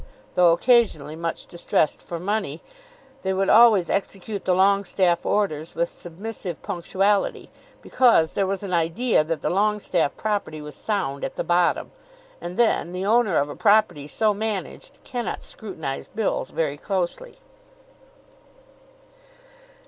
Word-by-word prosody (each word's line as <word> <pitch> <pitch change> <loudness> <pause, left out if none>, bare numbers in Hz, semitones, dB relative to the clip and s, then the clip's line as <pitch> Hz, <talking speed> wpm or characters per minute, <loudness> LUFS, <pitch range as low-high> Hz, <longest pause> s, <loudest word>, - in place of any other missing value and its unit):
Though 175 -1 +5
occasionally 170 - +2
much 165 +1 -4
distressed 170 -3 0
for 170 - -6
money, 190 -5 -2 0.6
they 190 - -1
would 195 +1 0
always 220 -6 +6
execute 200 +1 -3
the 185 - +3
Longestaffe 190 -2 +2
orders 165 -7 -1
with 170 0 0
submissive 180 0 -7
punctuality, 195 +2 0 0.3
because 230 -11 +4
there 195 - 0
was 195 +1 -3
an 190 -2 -4
idea 170 +5 +2
that 160 0 -3
the - - 0
Longestaffe 195 -5 0
property 205 -7 -2
was 150 0 -8
sound 165 -11 -3
at - - -4
the - - -2
bottom. 175 0 +1 0.5
And, 175 +1 -6
then, 225 -6 +2
the 185 +1 -3
owner 215 -4 +3
of 145 - +2
a 145 - -7
property 200 -9 +2
so 215 +7 +1
managed 210 -1 -5
cannot 245 -3 -4
scrutinise 160 -10 -6
bills 220 -1 -2
very 145 -3 -2
closely. 195 - -3
190 Hz, 135 wpm, -23 LUFS, 165-210 Hz, 0.6 s, always